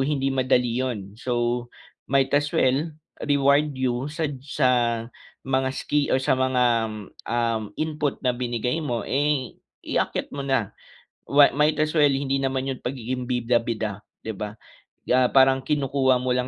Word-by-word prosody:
hindi 135 -1 0
madali 125 -2 +1
'yon. 105 -7 -3
So, 120 -1 -1 0.4
might 135 0 +2
as 145 +1 +2
well, 135 +5 +2 0.4
reward 145 +1 +3
you 130 +1 -1
sad 155 -4 -2
sa 140 -2 +1 0.8
mga 130 0 +1
ski 145 -1 0
or - - +3
sa 130 - +1
mga, 130 -1 +1 0.7
um, 115 -2 0
input 150 -2 -1
na 125 - +3
binigay 125 +4 -2
mo, 120 -7 -2
eh, 145 -2 0 0.3
iakyat - - -2
mo 140 - -5
na, 135 -7 0 0.5
wa 140 0 +6
might 150 +1 +2
as 155 +1 0
well, 145 -2 +5
hindi 135 0 0
naman 135 0 -1
'yon 130 -1 -5
pagiging 125 0 -3
bida-bida, 115 -4 -1 0.2
'di 110 - -3
ba, 105 +2 -6 0.5
ah, 125 0 +5
parang 135 0 +6
kinukuha 135 -3 +2
mo 125 0 -1
lang 125 0 0
130 Hz, 150 wpm, -24 LUFS, 125-140 Hz, 0.8 s, wa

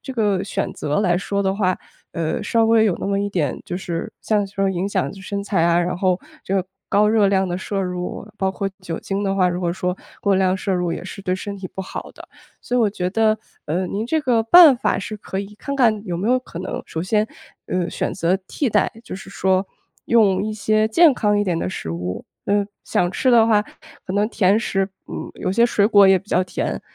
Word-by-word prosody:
这 265 - -6
个 205 -5 +1
选 195 - -3
择 150 +6 -1
来 180 -4 +2
说 200 +1 -1
的 190 0 +1
话， 185 -3 +1 0.4
呃， 160 -1 -2
稍 230 -1 +2
微 225 -1 +5
有 195 -5 +1
那 - - -2
么 200 0 0
一 205 - -1
点 160 -9 -1
就 180 - -4
是 180 +3 -4
像 210 -2 +1
说 195 0 -1
影 185 +1 -2
响 - - 0
就 195 - -11
是 190 - -10
身 200 0 -2
材 195 -5 +1
啊， 170 0 +4
然 175 0 -1
后 185 -1 +1 0.3
这 195 - -2
个 190 -1 0 0.2
高 210 +1 +4
热 215 -2 +4
量 190 -1 +2
的 175 +1 -2
摄 195 +1 -3
入 180 +1 -4
包 190 0 +1
括 195 +1 -3
酒 170 -3 -5
精 195 +1 -3
的 195 -1 0
话， 185 -2 +3
如 180 0 -2
果 175 -1 0
说 180 +1 -2 0.2
过 200 -1 +2
量 190 0 +2
摄 195 +1 -2
入 180 -2 0
也 - - -5
是 190 +1 -8
对 185 -1 0
身 200 +1 -5
体 190 -2 -7
不 190 - -4
好 - - -7
的。 - - -13 0.3
所 250 - -2
以 - - +3
我 220 - +4
觉 180 -3 -2
得， 220 +1 +2 0.3
呃， 175 +5 -1
您 205 +4 -3
这 315 +4 +1
个 240 -5 +2
办 300 +2 +8
法 - - 0
是 215 +2 -5
可 195 -2 -6
以 200 +1 -6
看 280 - -4
看 220 -5 +3
有 175 - -2
没 195 +6 -1
有 255 +1 +4
可 240 -9 -10
能， 185 - -4
首 160 - -4
先， 210 +3 +1 0.4
呃， 180 -1 -1
选 - - -2
择 180 0 +1
替 275 - -1
代， 205 - +2
就 - - -7
是 195 - -11
说， 190 0 +1 0.4
用 200 -5 +4
一 215 - -2
些 215 +1 +1
健 315 +6 +6
康 210 -4 +1
一 205 - +2
点 175 -4 0
的 - - -2
食 80 - -5
物， 90 +2 -4 0.2
嗯， 205 0 +2 0.2
想 175 - +1
吃 255 +6 +1
的 230 -2 +6
话 210 -2 +4 0.4
可 185 - -4
能 205 +1 +1
甜 205 -2 +3
食， 195 -4 0 0.2
嗯 - - -6
有 - - -3
些 235 +3 +4
水 205 -4 +2
果 205 -3 +6
也 190 - +6
比 195 - -20
较 180 - +2
甜， 180 - -3
195 Hz, 260 characters per minute, -21 LUFS, 185-215 Hz, 0.4 s, 办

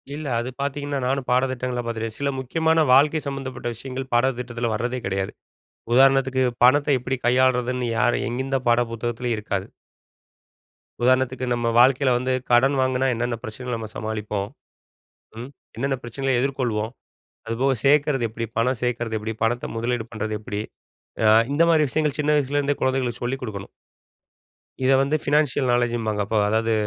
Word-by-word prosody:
இல்ல. 155 0 -6
அது 120 +2 -3
பார்த்தீங்கன்னா, 140 0 -2
நானும் 135 -1 -1
பாடத்திட்டங்கள்ல 125 -1 0
பார்த்துருக்கேன். 115 -1 -4
சில 140 0 0
முக்கியமான 160 +4 +2
வாழ்க்கை 150 +3 +4
சம்மந்தப்பட்ட 130 -3 -4
விஷயங்கள் 130 +2 -6
பாடத்திட்டத்தில 120 -2 0
வர்றதே 120 +3 -2
கிடையாது. 95 0 -2 0.6
உதாரணத்துக்கு 135 0 +4 0.2
பணத்த 145 +3 +5
எப்பிடி 125 +1 -3
கையாள்றதுன்னு, 125 -1 +2
யாரும் 120 +2 +1
எந்த 130 +2 -1
பாட 120 +1 +4
புத்தகத்துலயும் 120 0 -2
இருக்காது. 105 - -3 1.4
உதாரணத்துக்கு, 130 0 +2
நம்ம 120 -1 -1
வாழ்க்கையில 130 +1 +5
வந்து 130 +1 -1 0.2
கடன் 135 +4 +4
வாங்கினா, 130 0 +1
என்னென்ன 120 0 -1
பிரச்சனைகள 125 +2 -5
நம்ம 110 -1 -7
சமாளிப்போம்? 105 -2 -3 0.9
ம், 125 +3 -7 0.3
என்னென்ன 135 +3 -1
பிரச்சனைகள 125 +2 -1
எதிர்கொள்வோம்? 120 -5 -1 0.6
அதுபோக, 130 +4 +1
சேர்க்கிறது 140 -3 +3
எப்பிடி? 115 +1 -5
பணம் 125 +1 +1
சேர்க்கிறது 120 -2 -1
எப்பிடி? 110 +1 -4
பணத்த 120 +2 -1
முதலீடு 120 0 -1
பண்ணுறது 110 0 -3
எப்பிடி? 105 0 -4 0.6
அ - - +5 0.3
இந்தமாரி 165 0 +4
விஷயங்கள், 150 -2 0
சின்ன 150 +1 +1
வயசுல 145 0 0
இருந்தே 145 0 -1
குழந்தைகளுக்கு 130 -3 -1
சொல்லிக் 130 +2 -2
கொடுக்கணும். 100 -5 -6 1.1
இத 135 - +4
வந்து 140 +3 +1
பைனான்ஷியல் 145 -3 +1
நாலேட்ஜ்ம்பாங்க. 120 -3 0
அப்ப, 110 - -3
அதாவது 110 +1 +1
125 Hz, 140 wpm, -23 LUFS, 115-135 Hz, 1.4 s, பணத்த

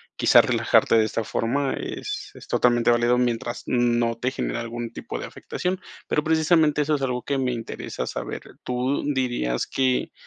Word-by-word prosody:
quizás - - +6
relajarte - - +3
de 110 - +5
esta 110 +1 -2
forma, 135 +6 0
es - - -5
es - - -13
totalmente 120 -1 +3
válido 120 +1 +3
mientras 120 -1 -1
no 120 -1 +2
te 125 +2 -1
genere 120 - -3
algún 115 0 -5
tipo - - -6
de - - -5
afectación, 185 +1 -4 0.3
pero, 150 - +1
precisamente 160 -1 +3
eso 150 +1 +1
es 140 - -4
algo 125 -2 -1
que 140 -1 -1
me 130 -1 0
interesa 115 -2 -5
saber, - - -5 0.2
¿tú 125 +2 -1
dirías 120 - -1
que 130 -1 0
125 Hz, 170 wpm, -24 LUFS, 120-140 Hz, 0.3 s, quizás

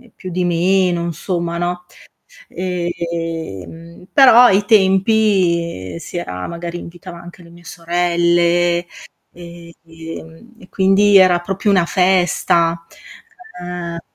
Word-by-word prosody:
più 185 - -9
di 180 +1 -1
meno, 175 0 +1
insomma 170 0 -4
no? 175 +1 -4 0.6
Ehm 170 - -6
però 250 -3 +7
ai 205 -4 +4
tempi 190 - +1
si 170 - -9
era 90 - -5
magari 170 0 -6
invitava 175 +1 -11
anche 175 +1 -14
le 170 - -16
mie 175 0 -17
sorelle 175 0 0 0.5
e 170 -1 -13
ehm 165 +6 -11
e 185 - -16
quindi 195 +1 +3
era 185 -2 +5
proprio 195 +3 -2
una 185 -3 +3
festa. 175 -2 +1 1.0
Eh 170 0 -6
175 Hz, 110 wpm, -17 LUFS, 170-185 Hz, 1.0 s, però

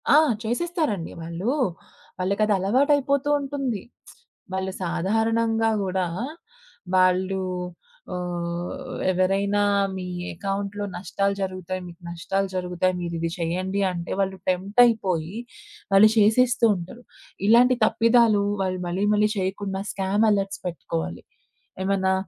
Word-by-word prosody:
ఆ! - - +7 0.3
చేసేస్తారండి 245 - -1
వాళ్ళూ. 170 +8 -2 0.7
వాళ్ళకది 200 +3 +1
అలవాటు 245 +10 +2
అయిపోతూ 280 0 0
ఉంటుంది. 275 -6 -3 0.7
వాళ్ళు 190 0 -2
సాధారణంగా 225 +6 +1
గూడా 185 -1 -1 0.9
వాళ్ళు 185 +1 +3 0.7
ఆహ్, 180 +8 -4
ఎవరైనా 195 +2 +1 0.3
మీ 185 -1 -5 0.3
అకౌంట్‌లో 200 +2 -3
నష్టాలు 195 +2 -1
జరుగుతాయి. 185 -1 -3
మీకు 170 0 -13
నష్టాలు 195 +3 -2
జరుగుతాయి. 180 0 0
మీరిది 170 -1 -2
చేయండి 185 +3 -1
అంటే 175 -1 -5
వాళ్ళు 190 -1 0
టెంప్ట్ 190 +5 -1
అయిపోయి 190 -5 0 0.6
వాళ్ళు 195 +2 +8
చేసేస్తూ 235 +3 +4
ఉంటారు. 185 +7 -8 0.4
ఇలాంటి 245 +3 +6
తప్పిదాలు 230 -2 +4 0.2
వాళ్ళు 185 -1 -1
మళ్ళీ 180 +3 -1
మళ్ళీ 210 0 +3
చేయకుండా 190 0 -2
స్కామ్ 195 +3 +1
అలర్ట్స్ 195 -1 -1
పెట్టుకోవాలి. 85 - -4 0.6
ఏమన్నా 190 -1 +1
195 Hz, 105 wpm, -24 LUFS, 180-220 Hz, 0.9 s, వాళ్ళు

